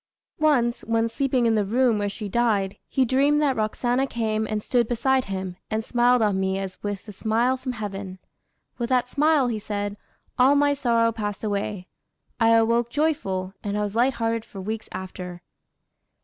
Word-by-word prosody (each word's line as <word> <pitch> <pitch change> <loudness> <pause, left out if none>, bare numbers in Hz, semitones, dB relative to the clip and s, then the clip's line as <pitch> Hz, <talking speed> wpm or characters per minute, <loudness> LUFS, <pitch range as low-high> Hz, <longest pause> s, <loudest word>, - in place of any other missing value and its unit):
Once, 255 -6 +2
when 230 0 +1
sleeping 255 0 0
in 230 - +3
the 215 -2 +2
room 230 +2 +2
where 205 0 0
she 210 +1 -6
died, 205 -3 +1
he 265 - +1
dreamed 280 +4 +3
that 285 -3 +2
Roxana 245 +4 0
came 220 -3 -1
and 210 -1 -2
stood 240 -3 +1
beside 260 +2 +1
him, 190 -2 -5
and 220 0 -2
"smiled 245 -1 +3
on 200 -3 +1
me 190 0 0
as 195 -1 -6
with 205 0 -4
a - - -7
smile 225 +5 +1
from 255 0 -5
heaven. 200 -4 -6 0.6
With 235 0 -2
that 250 -1 +2
smile," 295 -1 +3
he 225 -3 -2
said, 205 -1 -4 0.4
"all 265 +3 +6
my 285 0 +4
sorrow 235 -4 +2
passed 210 -2 -4
away. 200 -2 -2 0.5
I 225 -1 +4
awoke 230 +1 +3
joyful, 240 -11 -1
and 205 0 -2
I 210 - 0
was 205 0 -4
lighthearted 230 -2 +1
for 205 -3 -11
weeks 220 +3 -5
after." 180 -1 -7
225 Hz, 175 wpm, -24 LUFS, 205-250 Hz, 0.6 s, all